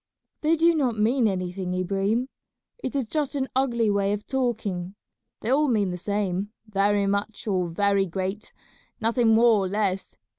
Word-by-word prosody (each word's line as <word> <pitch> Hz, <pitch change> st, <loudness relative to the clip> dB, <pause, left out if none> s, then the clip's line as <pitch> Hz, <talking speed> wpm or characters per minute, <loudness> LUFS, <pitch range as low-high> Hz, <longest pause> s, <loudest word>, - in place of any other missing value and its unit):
"They 315 Hz, +2 st, +3 dB
do 335 Hz, +1 st, +4 dB
not 260 Hz, -8 st, 0 dB
mean 230 Hz, +3 st, +3 dB
anything, 185 Hz, -1 st, -2 dB
Ibrahim; 195 Hz, +6 st, 0 dB, 0.5 s
it 310 Hz, -, -5 dB
is 270 Hz, -3 st, 0 dB
just 290 Hz, +4 st, -2 dB
an 265 Hz, -1 st, 0 dB
ugly 240 Hz, -4 st, +2 dB
way 200 Hz, 0 st, +1 dB
of 210 Hz, 0 st, -4 dB
talking. 210 Hz, -8 st, -2 dB, 0.5 s
They 225 Hz, -, -2 dB
all 295 Hz, +3 st, +3 dB
mean 210 Hz, -7 st, +1 dB
the 180 Hz, -, -4 dB
same, 200 Hz, 0 st, -2 dB
'very 205 Hz, -1 st, +1 dB
much' 200 Hz, +2 st, -2 dB
or 185 Hz, -4 st, 0 dB
'very 200 Hz, +2 st, +2 dB
great,' 190 Hz, +4 st, -4 dB, 0.5 s
nothing 230 Hz, +2 st, +2 dB
more 225 Hz, 0 st, +5 dB
or -, -, -1 dB
less. 195 Hz, -1 st, -2 dB
210 Hz, 160 wpm, -25 LUFS, 195-240 Hz, 0.5 s, more